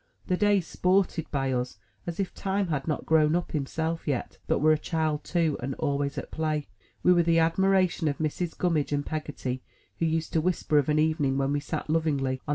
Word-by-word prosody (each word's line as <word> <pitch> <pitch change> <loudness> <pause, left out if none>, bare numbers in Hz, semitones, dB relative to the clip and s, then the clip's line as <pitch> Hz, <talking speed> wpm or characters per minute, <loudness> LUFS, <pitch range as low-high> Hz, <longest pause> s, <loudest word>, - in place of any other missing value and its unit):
The 185 - +1
days 205 -2 +3
sported 180 -3 +1
by 135 -2 0
us, 125 -2 -2 0.3
as 170 +1 -4
if 190 -2 -1
Time 195 -1 -1
had 145 -2 -2
not 155 - -2
grown 155 0 +4
up 175 - -2
himself 160 +3 -2
yet, 135 -4 -2
but - - +2
were 155 +2 +4
a 155 - +4
child 155 -3 -1
too, 165 -4 +1
and 135 +2 -3
always 145 -1 -1
at - - -5
play. 155 -2 -2 0.3
We 180 - +6
were 175 - +4
the 165 0 +3
admiration 185 +1 +3
of 145 - 0
Mrs. 160 +2 -2
Gummidge 160 -5 +1
and 145 0 0
Peggotty, 145 -5 -4 0.4
who 165 - +2
used 160 0 -1
to 160 - +3
whisper 160 -3 +2
of 145 - 0
an 150 - +3
evening 155 -3 +2
when 135 +1 +1
we 145 - +1
sat, 145 - -4
lovingly, 140 -5 0
on. - - -7
155 Hz, 210 wpm, -27 LUFS, 145-170 Hz, 0.4 s, We